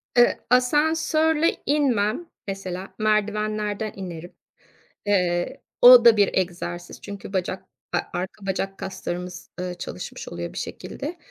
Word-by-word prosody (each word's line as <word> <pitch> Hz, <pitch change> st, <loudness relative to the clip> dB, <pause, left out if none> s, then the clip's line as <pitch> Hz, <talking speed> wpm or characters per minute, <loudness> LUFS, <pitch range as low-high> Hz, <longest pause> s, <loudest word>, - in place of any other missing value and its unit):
Iıı, 240 Hz, 0 st, +6 dB, 0.2 s
asansörle 315 Hz, +5 st, +3 dB
inmem 270 Hz, -1 st, +1 dB, 0.2 s
mesela 190 Hz, -1 st, -5 dB
merdivenlerden 215 Hz, 0 st, 0 dB
inerim. 175 Hz, -2 st, -7 dB, 0.7 s
Eee, 180 Hz, -4 st, +1 dB, 0.2 s
o 245 Hz, -1 st, +10 dB
da 230 Hz, -2 st, +8 dB
bir 200 Hz, -1 st, +5 dB
egzersiz 175 Hz, -1 st, -3 dB
çünkü 200 Hz, -1 st, -8 dB
bacak 185 Hz, 0 st, -2 dB, 0.3 s
a -, -, +3 dB, 0.2 s
arka 190 Hz, +3 st, -5 dB
bacak 195 Hz, 0 st, -2 dB
kaslarımız, 180 Hz, -1 st, -6 dB
ııı, 180 Hz, 0 st, -3 dB
çalışmış 170 Hz, -, -7 dB
oluyor 85 Hz, 0 st, -5 dB
bir -, -, -9 dB
şekilde. -, -, -6 dB
200 Hz, 115 wpm, -24 LUFS, 180-240 Hz, 0.7 s, o